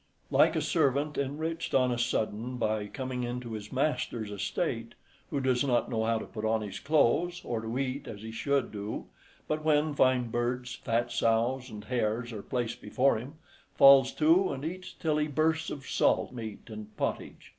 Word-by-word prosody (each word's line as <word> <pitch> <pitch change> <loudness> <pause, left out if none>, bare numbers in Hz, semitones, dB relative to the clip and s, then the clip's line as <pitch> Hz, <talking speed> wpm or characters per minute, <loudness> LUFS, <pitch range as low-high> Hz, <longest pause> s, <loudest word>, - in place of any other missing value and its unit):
Like - - +5
a - - +1
servant 140 +2 +1
enriched 160 +4 -2
on 130 -1 +4
a 120 - -1
sudden 120 0 -1
by 110 -3 -1
coming 130 +1 -4
into 120 0 -4
his 105 -1 -7
master's 125 -5 -1
estate, 115 +3 -2 0.3
who 140 - -1
does 130 -1 +2
not 125 -3 +1
know 110 -1 0
how 115 0 +2
to - - -5
put 110 - -7
on 110 0 +1
his 100 -2 -6
clothes, 160 +4 +2
or 115 -2 -2
to 115 +2 -4
eat 135 +1 -2
as 105 -1 -8
he 110 - -6
should 140 +2 0
do; 105 +1 -5 0.4
but 155 0 -1
when 155 -1 +2
fine 130 -4 +2
birds, 125 +1 -1
fat 115 +1 -1
sows, 120 +3 +1
and 105 -2 -8
hares 115 0 -1
are 105 - -5
placed 120 -1 -3
before 135 -1 +2
him, 135 +7 -9 0.4
falls 135 -1 +8
to 165 +5 +4
and 140 +1 -5
eats 185 +3 -5
till 155 -3 0
he 150 0 +1
bursts, 155 +2 +1
of 135 -2 -7
salt - - +2
meat 110 -4 -6
and 110 -1 -9
pottage. - - -3
125 Hz, 185 wpm, -29 LUFS, 115-140 Hz, 0.4 s, falls